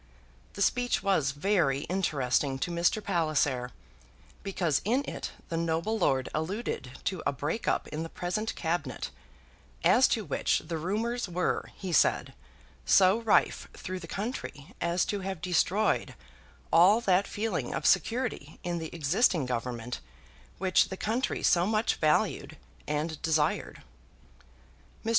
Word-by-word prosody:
The - - 0
speech 245 -5 +1
was 190 -9 +2
very 145 -2 +1
interesting 140 -7 0
to 175 - -2
Mr. 175 +5 +1
Palliser, 155 -8 0 0.7
because 175 -7 0
in 250 +7 +1
it - - -4 0.2
the 165 - -2
noble 165 +6 0
lord 135 -7 +2
alluded 160 - -3
to 185 -4 -2
a - - +3
break 145 - -3
up - - +1
in 155 - -4
the 165 - -4
present 185 +7 -3
Cabinet, 160 -5 -2 0.7
as - - +6
to - - -1
which - - +1
the 165 -2 -3
rumours 220 +6 -2
were, 180 +1 -1
he 185 -3 -5
said, - - +3 0.5
so 190 +3 +5
rife 225 -2 +2
through 185 0 -5
the 170 - -9
country 195 - -5
as 170 +1 +1
to 205 - -2
have 190 -2 -4
destroyed 185 +4 +1 0.6
all 185 +7 +7
that 190 -2 +2
feeling 220 +2 -2
of - - -3
security 230 - +1
in 175 -1 -2
the 160 -1 -5
existing 165 - +2
Government 125 -1 -3 0.6
which 185 -1 +3
the 190 - -5
country 230 +6 -1
so 175 +1 +4
much 215 +1 +1
valued 155 -1 +1 0.3
and 150 +1 -2
desired. 155 -2 0 1.2
Mr. - - -1
175 Hz, 140 wpm, -29 LUFS, 150-200 Hz, 1.2 s, all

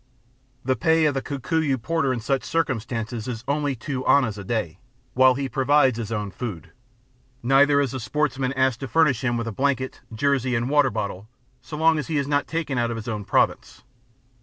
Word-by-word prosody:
The 130 0 +2
pay 160 +1 +3
of 150 - +2
the 135 - -2
Kikuyu 140 0 -1
porter 160 +2 0
in 125 - -1
such 135 +1 -1
circumstances 120 -6 -2
is 115 -2 -5
only 145 -1 0
two 130 +2 -4
annas 125 -7 +4
a 100 - -7
day, 95 -5 -3 0.3
while 130 0 +5
he 135 +1 -2
provides 135 -2 +2
his 115 -1 -5
own 105 -3 -3
food; 95 - -6 0.7
neither 140 +3 +4
is 140 -4 0
the 130 - -4
sportsman 135 +3 -1
asked 130 -3 +1
to 135 - -5
furnish 140 -2 +2
him 120 -1 0
with 115 - -2
a - - -2
blanket, 130 +2 -1
jersey, 130 +1 0
and 120 +3 -1
water 145 -2 +4
bottle 100 -3 -4 0.3
so 150 - -8
long 160 0 +3
as 150 - -4
he 160 -3 -1
is 140 -1 0
not 145 0 0
taken 155 -5 -2
out 120 -1 +1
of 115 - -3
his 110 - -7
own 105 -3 -4
Province. - - 0
130 Hz, 200 wpm, -24 LUFS, 115-145 Hz, 0.7 s, while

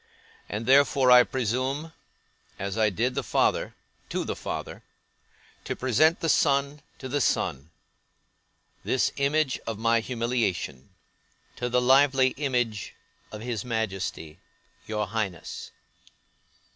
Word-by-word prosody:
And 105 +2 -4
therefore, 135 0 +5
I 125 0 +10
presume 130 +6 -2 0.6
(as 100 0 -4
I 110 -1 +3
did 115 +6 -1
the - - -1
father, - - 0 0.3
to - - -2
the - - -4
Father) - - -6 0.8
to - - -3
present 145 +7 +2
the 165 - 0
son 140 -1 +2 0.2
to 130 - -7
the 140 +2 -1
Son; 70 - 0 1.1
this 130 - +1
image 140 0 +1
of 115 -2 -3
my 115 +1 +2
humiliation, 115 - -2 0.7
to 125 - -2
the 125 +1 +2
lively 130 +1 +4
image 125 -7 -2 0.4
of 105 - -8
his 115 -2 -3
Majesty, 95 -8 -4 0.5
your 105 -1 -1
Highness. 100 -4 -4
125 Hz, 120 wpm, -26 LUFS, 110-135 Hz, 1.1 s, I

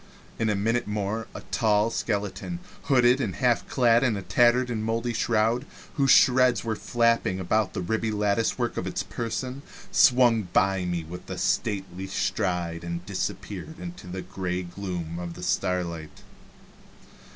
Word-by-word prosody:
In 110 - +1
a 105 - +1
minute 115 +4 0
more 105 +2 -2
a - - -6
tall 110 0 +2
skeleton, 105 - -2 0.3
hooded, 125 -1 +4
and 100 -7 -2
half 125 -2 +1
clad 120 -2 +3
in 115 -6 +2
a 100 - -5
tattered 120 +6 +3
and 110 -2 -2
moldy 115 +2 -1
shroud, 115 +2 +1 0.3
whose 140 -2 +1
shreds 125 0 +5
were 115 -1 -1
flapping 115 -5 +1
about 95 +2 0
the 95 - -2
ribby 110 +4 -1
latticework 105 +1 0
of - - -2
its - - -2
person, 125 +3 -4 0.3
swung 120 -5 +5
by 95 -1 +2
me 85 -2 -2
with 90 +3 -10
a - - -4
stately 95 -3 -1
stride 85 -3 -1
and 85 +1 -5
disappeared 95 - -4
in 175 -1 -6 0.2
the 95 0 -5
gray 90 -1 -3
gloom 85 -2 -5
of 85 -1 -6
the 90 - -9
starlight. 85 -4 -2
105 Hz, 150 wpm, -26 LUFS, 90-120 Hz, 0.3 s, shreds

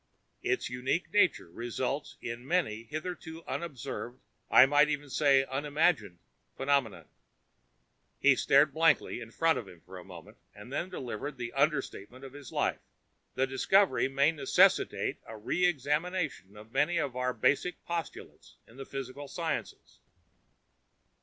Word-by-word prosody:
Its 380 -1 0
unique 130 +8 -2
nature 185 - +2
results 125 - -4
in 120 0 -5
many 130 -8 -1
hitherto 160 +2 -6
unobserved 130 -5 -5 0.3
I 125 - +8
might 145 +2 +4 0.2
say 140 -2 +4
even 135 - -12
unimagined 145 - +1 0.4
phenomena." 125 - 0 1.1
He 140 -1 +5
stared 140 +2 +4
blankly 160 -5 +2
in 115 - -8
front 165 +7 +1
of 110 - -9
him 90 - -14
for 95 0 -11
a - - -11
moment, 85 -3 -13 0.2
then 130 - -5
delivered 140 - -5
the 120 -1 -5
understatement 135 -4 -1
of 135 - -11
his 145 -3 -11
life. - - 0 0.6
"The 130 - +2
discovery 135 +4 +3
may 140 +3 +3
necessitate 145 -4 +2
a 110 - -8
re 145 +12 0
examination 150 - -2
of 110 +2 -13
many 170 +7 +1
of 135 -3 -1
our 125 0 0
basic 145 +8 0
postulates 165 - -6
in 115 - -17
the 135 - -8
physical 135 +1 -6
sciences." 165 +1 -5
135 Hz, 135 wpm, -30 LUFS, 120-155 Hz, 1.1 s, I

